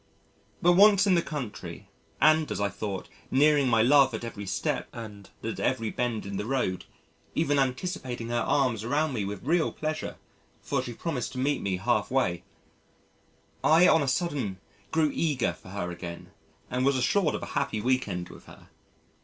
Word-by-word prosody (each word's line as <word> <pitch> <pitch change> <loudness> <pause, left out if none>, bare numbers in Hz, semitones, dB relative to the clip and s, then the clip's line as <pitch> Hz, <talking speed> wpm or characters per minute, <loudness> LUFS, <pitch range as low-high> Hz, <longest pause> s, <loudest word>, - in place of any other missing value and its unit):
But 175 - +6
once 200 +1 +6
in 195 - +4
the 170 - +4
country 105 - -6 0.3
and, 155 +1 +4
as - - -2
I 100 0 +1
thought, 100 -1 -5 0.2
nearing 145 0 +4
my 115 -2 +4
love 135 -1 +5
at 110 - -6
every 105 -4 -6
step - - -2
and 105 -4 -9
at 115 - -4
every 115 -4 0
bend 120 -4 -2
in 100 0 -4
the 105 - -3
road, 125 -9 -1 0.5
even 145 -3 +2
anticipating 130 -3 -2
her 120 0 0
arms 125 -7 +1
around 145 +5 0
me 105 -5 -2
with 100 +1 -6
real 165 +3 +2
pleasure 155 0 -4 0.4
(for - - -1
she 120 - -6
promised 135 -2 -3
to - - -7
meet 140 +3 0
me 95 -2 -1
half 120 +6 0
way), 90 -10 +1 1.2
I 165 +3 +6
on 160 - +5
a 140 - -1
sudden 135 - -1 0.3
grew 160 -2 +2
eager 145 -7 0
for - - -15
her 95 -2 -4
again 85 0 -8 0.4
and 125 +1 -1
was 140 +1 +3
assured 155 +6 +2
of - - -5
a - - -7
happy 140 -6 -1
week 130 +3 +1
end 90 -2 -4
with - - -13
her. - - -15
125 Hz, 180 wpm, -28 LUFS, 105-150 Hz, 1.2 s, But